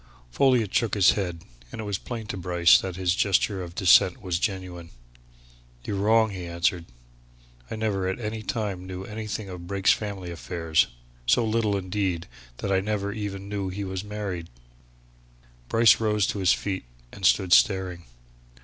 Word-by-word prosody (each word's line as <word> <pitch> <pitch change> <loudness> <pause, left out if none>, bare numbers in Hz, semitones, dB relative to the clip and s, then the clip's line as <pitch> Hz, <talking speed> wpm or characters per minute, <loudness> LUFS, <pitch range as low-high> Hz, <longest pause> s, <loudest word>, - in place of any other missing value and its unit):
Folliot 125 - +2
shook 115 -4 +1
his 100 -3 +6
head, 90 -5 -3 0.3
and - - -8
it - - -3
was 100 -2 -3
plain 115 -3 -6
to 105 - -5
Bryce 90 -1 +4
that 95 -2 -5
his 90 -1 +1
gesture 100 0 +1
of 85 -1 -8
dissent 90 -1 +5
was 90 -2 -2
genuine. 90 -4 -4 1.0
"You're 100 - -2
wrong," 110 +2 +3
he 90 -3 -6
answered. 85 0 0 0.8
"I - - -4
never 105 -4 -1
at 95 - -2
any 110 -1 -4
time 100 -5 -3
knew 95 0 -6
anything 105 0 -5
of 90 -2 -8
Brake's 100 0 +3
family 100 -4 -5
affairs. 85 -1 0 0.4
So 115 - +4
little 110 -2 +1
indeed, 95 -3 -2 0.3
that 100 - -3
I 95 - +3
never 100 0 -2
even 100 -2 -5
knew 100 -2 -3
he 100 +2 -4
was 95 0 -4
married." 100 -5 -5 1.2
Bryce 115 0 +5
rose 105 -3 +1
to 100 - -2
his 95 0 +4
feet 95 -8 -2 0.3
and - - -12
stood 90 -2 +4
staring. 95 -4 +3
95 Hz, 165 wpm, -26 LUFS, 90-105 Hz, 1.2 s, his